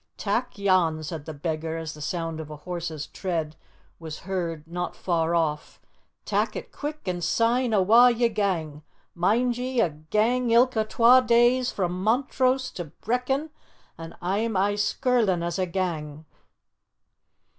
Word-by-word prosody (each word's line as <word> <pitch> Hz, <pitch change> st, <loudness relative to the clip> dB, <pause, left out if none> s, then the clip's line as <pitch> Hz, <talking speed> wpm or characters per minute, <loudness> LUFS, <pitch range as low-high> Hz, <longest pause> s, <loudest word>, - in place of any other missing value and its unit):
"Tak' 220 Hz, +3 st, -2 dB
yon," 180 Hz, -6 st, +2 dB
said 155 Hz, -1 st, -6 dB
the 160 Hz, -, -6 dB
beggar, 160 Hz, +2 st, -3 dB
as 160 Hz, -1 st, -5 dB
the 150 Hz, -, -11 dB
sound 165 Hz, 0 st, -3 dB
of 155 Hz, -1 st, -7 dB
a 150 Hz, -, -7 dB
horse's 165 Hz, -1 st, -5 dB
tread 165 Hz, -5 st, -3 dB, 0.4 s
was 160 Hz, -2 st, -8 dB
heard 170 Hz, -4 st, -4 dB
not 175 Hz, +1 st, -4 dB
far 170 Hz, -2 st, 0 dB
off, 155 Hz, -3 st, -1 dB, 0.5 s
"tak' -, -, 0 dB
it -, -, -7 dB
quick 300 Hz, +1 st, -6 dB
an' 180 Hz, -1 st, -2 dB
syne 235 Hz, +6 st, +1 dB
awa' 220 Hz, +5 st, +6 dB
ye 240 Hz, 0 st, +2 dB
gang! 180 Hz, -9 st, -2 dB, 0.3 s
Mind 235 Hz, +8 st, +1 dB
ye, 255 Hz, 0 st, -2 dB
a 180 Hz, -8 st, +3 dB
gang 215 Hz, +11 st, 0 dB
ilka 235 Hz, -1 st, +4 dB
twa 235 Hz, +3 st, +6 dB
days 245 Hz, +1 st, +3 dB
frae 185 Hz, -3 st, -1 dB
Montrose 255 Hz, +7 st, 0 dB
to 175 Hz, -, -6 dB
Brechin, 250 Hz, -, -2 dB, 0.4 s
an 165 Hz, 0 st, -10 dB
a'm 205 Hz, +4 st, 0 dB
aye 200 Hz, +2 st, +2 dB
skirlin' 205 Hz, -3 st, +1 dB
as 170 Hz, +1 st, -2 dB
a 185 Hz, -, 0 dB
gang." 160 Hz, -4 st, -3 dB
185 Hz, 145 wpm, -25 LUFS, 165-235 Hz, 0.5 s, awa